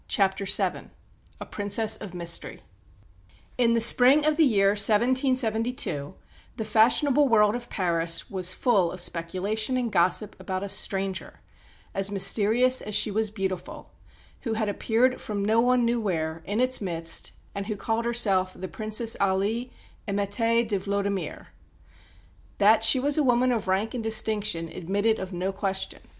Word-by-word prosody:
CHAPTER 195 -1 0
VII 195 - -1 0.5
A - - -7
PRINCESS 210 +2 -1
OF 200 -5 -10
MYSTERY 170 -1 -3 1.0
In 235 -1 +3
the - - +2
spring 255 +5 +5
of 305 0 +2
the 320 - +3
year 200 -8 +3
1772 225 - +1 0.4
the 220 - -4
fashionable 255 +6 +3
world 210 -2 +4
of 240 0 -7
Paris 165 -3 +1
was 185 -2 -1
full 190 -5 +1
of 185 - -8
speculation 190 +8 -2
and 240 -3 -2
gossip 185 +3 +1
about 185 0 -4
a 200 - -5
stranger, 195 0 -3 0.5
as 195 0 -1
mysterious 220 +6 +3
as 210 - -4
she 215 - +2
was 215 +1 0
beautiful, 190 -3 -6 0.5
who 230 - -4
had 220 -1 -2
appeared 235 +5 0
from 205 -2 -4
no 220 +2 +2
one 245 0 +2
knew 235 0 0
where, 160 -5 -3
in 205 +3 -2
its 255 -1 +1
midst, 165 -4 -1 0.2
and 200 0 -5
who 215 - -3
called 225 +3 -2
herself 195 -6 +1
the 185 - -7
Princess 220 +3 -3
Aly 200 +6 -1 0.4
Émettée 225 +4 0
de 205 -3 -1
Vlodimir. 200 0 -3 1.1
That 215 +2 +4
she 255 +4 +6
was 285 +3 +2
a - - +2
woman 250 0 +2
of 225 -5 -2
rank 195 +5 -1
and 240 -3 -4
distinction 215 -6 0
admitted 205 +7 -1
of 190 0 -6
no 185 +2 -3
question. 190 -1 -4
210 Hz, 155 wpm, -25 LUFS, 190-235 Hz, 1.1 s, she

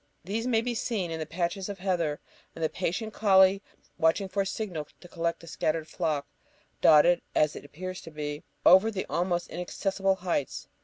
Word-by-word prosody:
These 220 +7 -2
may 225 -3 +3
be 245 +1 -2
seen, 210 -7 -2
and 160 0 -3
the 155 - -4
patches 180 +3 -2
of 200 - -5
heather, 175 -6 -1 0.4
and 165 - -5
the 160 - +2
patient 215 +5 -3
colley 195 -1 +5 0.4
watching 165 +4 +2
for 200 +1 -1
a 195 - -1
signal 185 -8 -4
to 175 - -13
collect 170 -1 -2
the - - -12
scattered 160 -1 -1
flock, 155 -6 -1 0.6
dotted, 165 +3 +6
as 150 0 +3
it - - -8
appears 185 +5 -7
to - - -10
be, 150 -1 -5 0.2
over 190 +5 +7
the 195 -4 -3
almost 175 0 0
inaccessible 195 +2 -1
heights. 175 -7 -2
180 Hz, 185 wpm, -28 LUFS, 160-195 Hz, 0.6 s, over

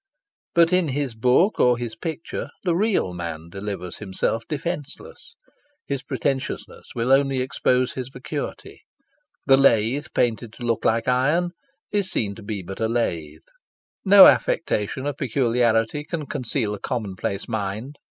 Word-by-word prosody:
But 170 +1 +5
in 180 -2 +3
his 140 -2 -2
book 125 - +3
or 125 -1 +4
his 120 -2 -5
picture 165 +6 -5
the 175 -3 +1
real 195 - +1
man 85 -2 -6
delivers 95 -2 -6
himself 105 +2 -1
defenceless. 165 - -6 0.5
His 140 -2 -3
pretentiousness 135 -1 -3
will 120 +2 0
only 135 -1 +3
expose 125 0 +1
his 130 -1 -5
vacuity. 135 +3 -6 0.6
The 135 -1 +6
lathe 135 +2 +3
painted 115 -2 0
to 120 - -10
look 115 -1 -1
like 115 +2 +2
iron 145 +8 +2 0.4
is 200 -2 0
seen 100 - -1
to 110 - -12
be 100 -2 -5
but 95 +2 -8
a 110 - +1
lathe. 85 -10 -2 0.6
No 195 0 +10
affectation 130 -2 +2
of 145 -1 -2
peculiarity 120 0 +1
can 155 -1 -4
conceal 120 -5 -2
a 105 - -6
commonplace 100 -4 -3
mind. 110 +5 -4
125 Hz, 140 wpm, -23 LUFS, 110-145 Hz, 0.6 s, No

